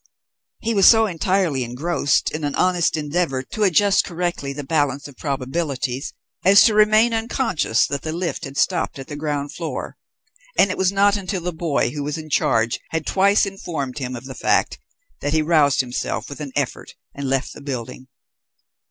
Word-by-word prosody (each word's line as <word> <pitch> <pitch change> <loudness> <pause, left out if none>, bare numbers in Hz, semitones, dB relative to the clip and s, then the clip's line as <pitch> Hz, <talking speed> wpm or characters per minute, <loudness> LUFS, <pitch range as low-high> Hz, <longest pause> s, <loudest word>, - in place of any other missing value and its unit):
He 230 - -1
was 195 -3 +5
so 225 -1 +7
entirely 185 -6 0
engrossed 145 +5 0
in 155 0 -5
an 145 -1 -2
honest 180 -3 +2
endeavour 150 -3 -1
to 215 - -7
adjust 200 +1 +4
correctly 175 -5 -3
the 145 +1 -6
balance 145 -1 0
of 140 - -14
probabilities, 135 -1 -3 0.3
as 195 +2 +7
to 220 - +4
remain 215 +2 +4
unconscious 225 - +1
that 140 - -3
the 155 - -4
lift 170 0 -3
had 135 0 -8
stopped 175 -3 0
at 135 - -7
the 145 - -7
ground 145 -1 -3
floor, 165 -2 -5 0.6
and 200 - +5
it - - -4
was 190 0 +3
not 200 +1 +3
until 190 -1 -3
the 175 +1 -3
boy 160 -7 0
who 145 - -5
was 150 +2 -3
in 155 -1 -9
charge 115 -3 +1
had 160 -1 -3
twice 200 +2 +3
informed 160 -9 -5
him 130 -1 -4
of 120 +1 -8
the 135 - -7
fact, - - +1 0.4
that 145 - -1
he 155 -1 +2
roused 150 -4 +3
himself 125 -1 -4
with 140 +2 -8
an 145 -2 -5
effort - - -3 0.2
and 140 -1 -4
left 135 0 -1
the - - -12
building. 130 -2 -6
155 Hz, 185 wpm, -21 LUFS, 140-185 Hz, 0.6 s, so